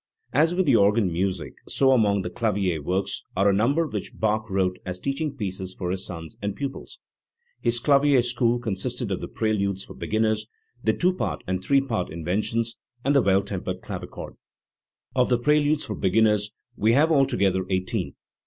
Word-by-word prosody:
As 165 +3 +3
with 185 0 +2
the 135 - +4
organ 100 -3 +3
music, 95 +2 -2
so 135 -1 +3
among 105 -6 +3
the 90 - -4
clavier 100 -8 0
works 90 +6 -1 0.2
are 95 +2 +4
a 100 - +4
number 140 +11 +2
which 105 -10 -6
Bach 110 0 0
wrote 95 -1 0
as 90 0 -5
teaching 140 - -2
pieces 95 -2 -4
for 90 -1 -3
his 95 0 -2
sons 80 -3 -8
and 100 -1 -2
pupils. 140 -1 -6 0.6
His 120 0 +1
clavier 140 0 +4
school 120 0 +1
consisted 120 +1 -3
of 95 - -2
the - - -4
preludes 100 -3 -1
for - - -11
beginners, 110 0 0 0.4
the - - +3
two 180 +1 +2
part 185 - -3
and 95 0 -2
three 135 +6 +4
part 110 - -2
Inventions, 105 +8 -1 0.3
and 140 +1 +3
the 140 - +6
Well 95 -2 +3
tempered 100 -2 -5
Clavichord. - - -7 0.8
Of 125 -1 +3
the 125 - +3
preludes 150 +3 +2
for - - -4
beginners 105 +1 +2 0.3
we 110 +2 +3
have 155 +5 +4
altogether 120 - +2
eighteen. 95 -1 -2
110 Hz, 175 wpm, -25 LUFS, 95-130 Hz, 0.8 s, the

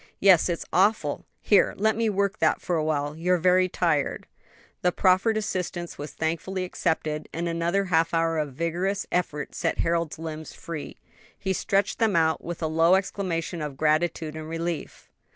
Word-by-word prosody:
"Yes; 185 -3 +5
it's 170 - -2
awful! 185 -6 +2
Here, 205 - +4
let 220 +2 +2
me 225 0 +1
work 200 0 0
that - - +2
for 175 - -2
awhile. 150 -2 -1
You're 180 +3 +2
very 185 +1 +3
tired." - - 0 0.6
The 180 - +3
proffered 190 +5 +3
assistance 180 -5 -3
was 145 +1 -6
thankfully 170 +4 -2
accepted, 155 -4 -2
and 170 +1 -3
another 170 +4 0
half 165 -2 +2
hour 165 -1 +1
of 145 -3 -3
vigorous 175 +6 -1
effort 160 -4 -2
set 165 - -1
Harold's 165 -1 0
limbs 160 -1 -7
free. 165 -3 -7 0.4
He 190 -1 -1
stretched 195 +1 0
them 220 -5 +2
out, 160 -1 +2
with 170 -1 -5
a - - +1
low 165 +3 +4
exclamation 180 -3 -2
of 145 -3 -5
gratitude 155 +1 0
and 155 0 -7
relief. 165 -2 -4
170 Hz, 165 wpm, -26 LUFS, 160-185 Hz, 0.6 s, Yes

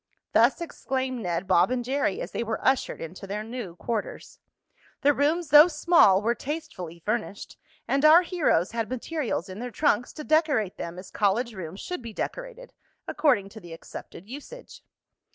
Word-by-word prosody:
Thus 235 +8 +4
exclaimed 260 -6 -3
Ned, 175 -1 -2
Bob 175 0 +4
and 250 -1 -2
Jerry 270 -5 0
as 175 - -6
they - - -2
were 225 -1 -4
ushered 265 -1 +1
into 180 +4 -8
their 210 +2 -4
new 225 -6 -7
quarters. 225 +2 -5 0.6
The 290 +1 +4
rooms, 300 +4 0
though 300 +3 +9
small, 300 - +4
were 235 +2 +2
tastefully 265 - -6
furnished, 210 +3 -4 0.3
and 275 +1 +1
our 320 +4 +8
heroes 330 - +1
had 225 -2 -2
materials 255 - -3
in 190 +2 -8
their 245 +1 -4
trunks 245 -3 +1
to 305 - -7
decorate 300 - +1
them 170 +1 -6
as 185 +1 -10
college 220 +4 +1
rooms 185 -1 -7
should 360 -6 -5
be 230 -2 -8
decorated, - - -6 0.3
according 255 -10 +2
to 220 - -11
the 175 -4 -11
accepted 165 +2 -10
usage. 295 - -10
240 Hz, 170 wpm, -26 LUFS, 195-295 Hz, 0.6 s, though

